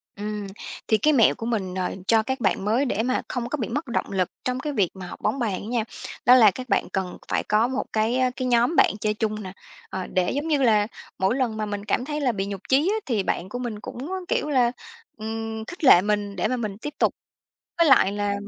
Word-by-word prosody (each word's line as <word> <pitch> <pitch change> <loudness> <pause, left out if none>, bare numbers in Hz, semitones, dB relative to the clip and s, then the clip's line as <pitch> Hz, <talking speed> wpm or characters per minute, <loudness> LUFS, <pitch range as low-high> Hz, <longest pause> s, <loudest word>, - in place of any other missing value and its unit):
Ừm, 210 0 -4 0.4
thì 220 - +4
cái 305 +9 +3
mẹo 235 -6 +5
của 225 - -6
mình, 200 -6 -2
ờ, 185 -1 -2
cho 225 -1 +4
các 265 +4 -3
bạn 195 -1 +1
mới 230 +7 +2
để 225 -4 0
mà 255 +2 0
không 245 -1 -3
có 300 - -2
bị 235 - -2
mất 290 +6 -3
động 235 - -2
lực 185 -2 0
trong 255 0 -1
cái 295 +2 -3
việc 200 -9 +2
mà 185 -2 -8
học - - -10
bóng 275 - 0
bàn 225 -5 0
á 205 - -8
nha, 235 -1 0 0.4
đó 250 - +8
là 220 -5 +7
các 255 +4 -8
bạn - - +1
cần 190 -2 -2
phải - - +1
có 215 +3 +2
một 260 +1 -2
cái, 220 +3 +1
ơ, 255 0 +3
cái 255 -1 -2
nhóm 240 +6 +3
bạn - - +5
chơi 210 0 +1
chung 215 0 -2
nè. 185 -1 -7 0.4
Ờ, 190 -1 -4
để 180 -1 0
giống 290 +3 -2
như 295 -3 +2
là 210 -4 +4 0.3
mỗi 190 +5 +2
lần 245 -5 -1
mà 215 - -1
mình 205 -1 -5
cảm 245 - 0
thấy 300 +1 -3
là 260 -3 +2
bị 195 -3 -2
nhụt 200 -1 -5
chí 285 +7 +4
á, - - +1
thì 225 -6 0
bạn 185 0 -2
của 245 - -5
mình 235 -4 -4
cũng 255 +6 -7 0.2
kiểu 300 - 0
là, 250 -4 +3 0.5
ừm, 220 0 -5
khích 350 +4 -10
lệ 255 -10 +8
mình 205 0 -1
để 185 - 0
mà 255 +3 -1
mình 210 -4 -4
tiếp 295 +7 -6
tục. - - +3 0.7
Với 335 - +5
lại 200 -7 +6
là 205 0 -1
225 Hz, 255 wpm, -24 LUFS, 205-255 Hz, 0.7 s, đó